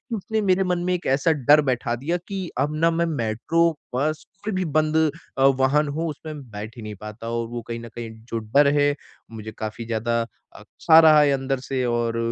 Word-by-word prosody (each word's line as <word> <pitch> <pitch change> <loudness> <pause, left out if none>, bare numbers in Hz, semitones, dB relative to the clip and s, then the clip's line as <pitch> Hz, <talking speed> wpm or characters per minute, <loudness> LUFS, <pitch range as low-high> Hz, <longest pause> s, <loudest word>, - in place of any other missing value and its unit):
उसने 220 +2 -2
मेरे 190 -1 +2
मन 180 -1 0
में - - +2
एक 180 0 -3
ऐसा 145 +4 +2
डर 150 +1 +5
बैठा 120 -1 -1
दिया 150 +8 -2
कि 195 -2 -4
अब 145 +2 0
ना 165 +2 +3
मैं 170 +1 +1
मेट्रो, 155 +4 +1 0.2
बस 155 +4 -1 0.2
कोई 215 -1 -2
भी 185 -1 -1
बंद 155 0 +1 0.4
अ, 135 - +4
वाहन 135 +2 +3
हो 160 +4 -2
उसमें 150 0 -7
बैठ 110 +3 -8
ही 115 - -8
नहीं 105 -1 -6
पाता 105 +2 -7
और 115 0 -2
वो 120 +1 -5
कहीं 115 0 -4
न 115 0 -9
कहीं 115 -1 -6 0.2
जो 115 - -1
डर 125 +7 +3
है 145 0 +3 0.4
मुझे 110 -1 -8
काफ़ी 110 +1 -5
ज़्यादा 115 +1 -1 0.3
अक्सा 160 0 +4
रहा 155 -2 +7
है 145 -1 +4
अंदर 135 -1 -1
से 130 -1 0
और 120 -1 0
135 Hz, 210 wpm, -23 LUFS, 115-160 Hz, 0.4 s, रहा